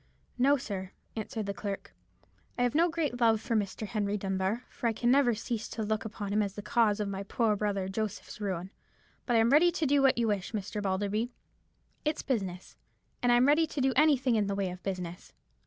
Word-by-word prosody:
"No, 280 +3 +5
sir," 190 -6 -5 0.2
answered 220 0 -4
the 200 - -2
clerk; 200 -1 -5 0.6
"I 245 - +2
have 245 - +1
no 335 +3 +4
great 300 -7 -2
love 225 -2 +5
for 230 +1 -2
Mr. 210 0 -1
Henry 210 -1 -1
Dunbar, 195 +4 -1
for 240 - -3
I 230 - +1
can 240 +2 +1
never 260 -4 +4
cease 225 0 -4
to 220 - -4
look 215 +1 -1
upon 205 -2 -4
him 215 - +3
as 200 -2 -2
the 205 - -6
cause 215 -1 +2
of 210 - -1
my 195 0 -3
poor 215 +2 +1
brother 200 -2 -1
Joseph's 210 +1 -4
ruin; 190 -2 -3 0.6
but 240 - +2
I - - +6
am 225 +2 +4
ready 330 +5 +6
to 330 - 0
do 280 0 +3
what 270 -2 +4
you 235 -1 +2
wish, 200 0 -2
Mr. 210 0 -3
Balderby. 205 +4 -1 0.7
It's 305 0 -1
business, 190 -8 -3 0.5
and 245 - +3
I'm 240 +1 +5
ready 305 +3 +4
to 295 - -5
do 265 0 +2
anything 275 -4 +4
in 210 -2 +2
the 200 - -1
way 195 -2 -1
of 180 0 -9
business. 180 -2 -5
215 Hz, 215 wpm, -30 LUFS, 200-245 Hz, 0.7 s, I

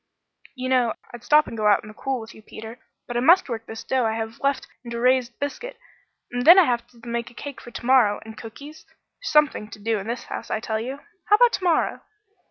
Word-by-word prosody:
"You 255 -1 -4
know 250 -3 +2 0.2
I'd 240 -1 -10
stop 300 +4 +5
and - - -8
go 215 -1 0
out 205 - +4
in - - -11
the 215 - -10
cool 265 +3 -3
with 225 +1 -11
you, - - -15
Peter, 220 +2 -10 0.3
but 240 - -6
I - - +2
must 340 +9 +5
work 230 -3 -5
this 225 0 -7
dough 260 -1 0
I 220 -1 +1
have 225 0 -5
left 275 -1 0 0.2
into 235 -1 -5
raised 250 0 +2
biscuit; 480 - -5 0.5
and 245 0 -2
then 345 +7 +9
I 375 - +9
have 240 -5 -1
to 240 -1 -17
make 235 0 -3
a 240 - -20
cake 285 +1 -8
for - - -11
to 235 - -8
morrow 240 -5 +4
and 220 0 -10
cookies 280 +8 -11
there's - - -10
something 295 -8 +3
to 205 - -10
do 220 +1 -1
in 195 - -7
this 235 +1 -3
house, - - -7
I - - -1
tell 220 -1 -2
you! 265 +5 -5 0.2
How 420 - +6
about 485 +2 +5
to - - -2
morrow?" 345 -3 +1
240 Hz, 250 wpm, -24 LUFS, 225-280 Hz, 0.5 s, then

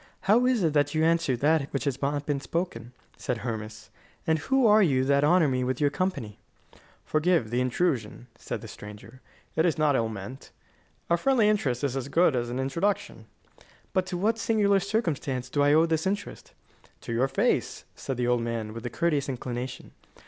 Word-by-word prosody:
"How 235 +5 +4
is 250 -6 +2
it 160 -3 +2
that 145 0 +1
you 155 - +2
answer 165 -6 +2
that 150 +2 +1
which 140 - -2
has 140 -2 -2
not 145 +1 -1
been 145 -2 -1
spoken?" 125 -5 -4 0.3
said 125 - -2
Hermas; 110 -2 -6 0.3
"and 160 -2 +2
who 265 - +2
are 215 0 +6
you 135 -9 +3
that 140 +1 +3
honour 165 +1 +4
me 130 -2 0
with 130 +1 -2
your 145 -1 +2
company?" 140 - -3 0.7
"Forgive 155 -7 +1
the 120 +1 +1
intrusion," 125 -4 -1
answered - - -6
the - - -9
stranger; 105 +5 -11 0.3
"it 160 - +3
is 165 -3 +1
not 150 -2 +3
ill 115 -3 +1
meant. 110 +5 -8 0.6
A 170 - +3
friendly 240 +2 +3
interest 145 - 0
is 135 -2 0
as 135 -1 -3
good 160 0 +3
as 120 -1 -1
an 125 - -4
introduction." 165 +10 -2 0.7
"But 185 -1 +1
to 180 -1 -3
what 220 +5 +1
singular 205 -3 +2
circumstance 155 - -2
do 145 - +1
I 145 +1 +4
owe 160 +2 +5
this 160 +1 0
interest?" 200 +1 -4 0.5
"To 115 - -5
your 125 +3 +2
face," 135 - 0
said 135 - -5
the 125 - 0
old 120 -1 +2
man, 115 -2 -3
with 115 0 -8
a - - -4
courteous 150 -1 0
inclination. 125 0 -5
145 Hz, 190 wpm, -27 LUFS, 125-175 Hz, 0.7 s, are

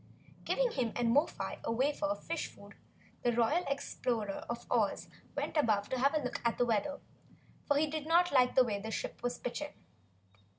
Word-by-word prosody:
Giving - - +2
him 240 - -1
and 235 -1 +2
Mo 290 +6 +5
fi - - -5
a - - -1
wafer 285 +5 +1
of 300 - -3
fish - - -2
food, - - -14 0.5
the 240 - +2
Royal 240 +10 +2
Explorer 235 -6 -2
of 235 0 -4
Oz - - +1 0.3
went - - -2
above 215 -9 +2
to 260 - -1
have 275 +4 +3
a 305 - +2
look 250 - -3
at 235 -1 +1
the 245 - +3
weather, 235 +5 0 0.7
for 285 - +3
he 305 - +4
did 310 0 -4
not 350 +2 +4
like 250 -3 +4
the 260 - +7
way 210 -4 -1
the 220 +2 -5
ship - - -4
was 245 0 -1
pitching. 290 +4 -4
255 Hz, 200 wpm, -33 LUFS, 235-295 Hz, 0.7 s, the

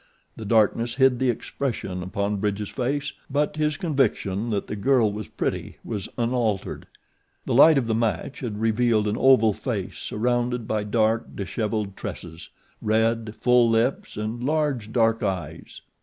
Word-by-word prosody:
The 110 - -8
darkness 115 +2 +2
hid 130 -2 +4
the 130 - +2
expression 115 -6 -3
upon 100 +3 -2
Bridge's 105 0 -2
face, 140 +3 -2 0.2
but 145 +2 0
his 150 -1 0
conviction 120 - 0
that 105 -3 -1
the - - -5
girl 110 +1 +3
was 105 -3 -6
pretty - - -3
was 105 -5 -4
unaltered. 115 -4 -1 0.6
The - - -1
light 150 +5 +7
of 130 - +1
the 115 - 0
match 110 - -1
had 110 -5 -4
revealed 115 -1 +2
an 105 - 0
oval 115 -4 +5
face - - -4
surrounded 120 0 -1
by 105 -1 -1
dark, 110 +2 0
dishevelled 105 0 -3
tresses, 80 +1 -8 0.3
red, 110 0 +1
full 125 -1 +4
lips, 115 +2 0
and 110 +3 -4
large, 140 -7 0
dark 115 -1 +2
eyes. 95 -5 -4
115 Hz, 150 wpm, -24 LUFS, 105-125 Hz, 0.6 s, light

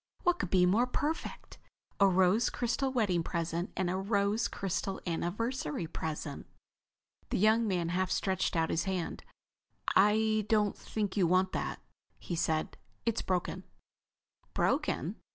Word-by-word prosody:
What 355 0 +2
could 185 - -2
be 180 -1 +4
more 220 +7 +3
perfect? 300 +5 -3 0.4
A 200 - +7
rose 190 +4 +4
crystal 250 +3 -1
wedding 205 -9 +1
present 170 +1 -2
and 185 - +1
a 180 +1 0
rose 200 +3 +1
crystal 195 -2 -3
anniversary 175 - -2
present!" 155 -2 -5 0.8
The - - 0
young 220 +3 +4
man 175 -4 0
half 185 +1 0
stretched 190 -1 0
out 160 -1 +1
his 165 - 0
hand. 185 -4 -3 0.7
"I 215 +2 +4
don't 210 -2 +3
think 210 -3 -3
you 190 -4 +3
want 185 +2 +3
that," - - -3 0.3
he 175 - -5
said. 160 -1 -1 0.3
"It's 230 -1 +1
broken." 185 0 -2 0.9
"Broken?" - - 0
190 Hz, 135 wpm, -31 LUFS, 175-215 Hz, 0.9 s, A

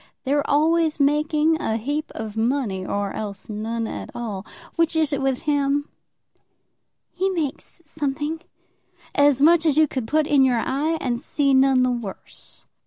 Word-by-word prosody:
They're 285 +1 0
always 315 +1 +2
making 300 +2 +2
a 220 - -1
heap 290 +7 -3
of 220 -1 -6
money, 225 -4 -1
or 200 +1 -2
else 205 -2 -6
none 225 +2 -3
at - - -6
all. 210 -5 -5 0.3
Which 330 -1 +1
is 315 -2 +1
it 280 - -1
with 270 -2 -1
him?" 285 -1 +1 1.2
"He 380 +2 -1
makes 335 -1 -4
something." 300 +1 -3 0.7
"As 285 -1 +4
much 330 +1 +6
as 305 -3 +2
you 315 -1 +5
could 260 -5 -4
put 310 +4 +2
in 285 -2 +4
your 255 -2 +3
eye 295 +7 -1
and 240 -2 -2
see 275 +1 0
none 265 -1 +4
the 255 - +2
worse." 235 -5 -8
280 Hz, 160 wpm, -23 LUFS, 240-305 Hz, 1.2 s, much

